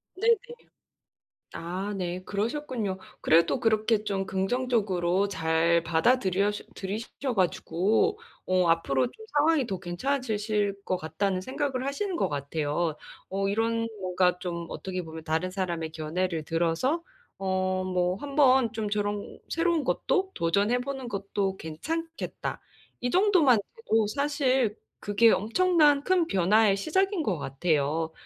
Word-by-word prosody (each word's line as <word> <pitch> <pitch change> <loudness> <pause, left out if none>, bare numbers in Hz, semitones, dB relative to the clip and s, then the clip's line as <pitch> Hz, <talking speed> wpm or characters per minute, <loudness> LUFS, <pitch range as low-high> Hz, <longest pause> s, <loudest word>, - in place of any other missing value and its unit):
네네. 455 +5 +4 1.2
아, 185 +5 -4
네, 180 -1 -3
그러셨군요. 220 -2 -2 0.2
그래도 165 +10 +4
그렇게 220 -1 +2
좀 195 -2 -1
긍정적으로 195 -3 0
잘 165 -1 +2
받아들여 190 +3 +2 0.2
들이셔 225 +6 -4
가지고 195 - +1 0.3
'어, 185 -1 +2
앞으로 140 -6 +2
좀 440 - -12
상황이 295 -2 +3
더 190 -5 -3
괜찮아지실 210 0 -1
것 185 - 0
같다.'는 185 +4 -1
생각을 260 +4 -2
하시는 375 +8 -2
것 - - +1
같아요. 150 +2 -2 0.3
어 195 +1 -1
이런 230 +2 0
뭔가 180 -1 +1
좀 170 -2 -4
어떻게 185 -1 -5
보면 160 -1 -9
다른 160 +3 -1
사람의 175 -4 -3
견해를 160 +1 -2
들어서 170 - 0 0.4
어 185 -1 0
뭐 180 -1 0
'한번 265 -2 +3
좀 220 -2 -3
저런 205 0 -2
새로운 335 -1 +1
것도 380 +7 0
도전해 200 +8 +2
보는 265 0 -5
것도 200 -2 -2
괜찮겠다.' 325 - -5 0.4
이 245 - -1
정도만 360 - +5 0.2
돼도 225 - +1
사실 265 -2 +1 0.2
그게 205 +3 +4
엄청난 295 - +3
큰 370 -3 +3
변화의 200 - +4
시작인 380 - +1
것 190 - 0
같아요. 155 +2 0
200 Hz, 275 characters per minute, -27 LUFS, 175-255 Hz, 1.2 s, 정도만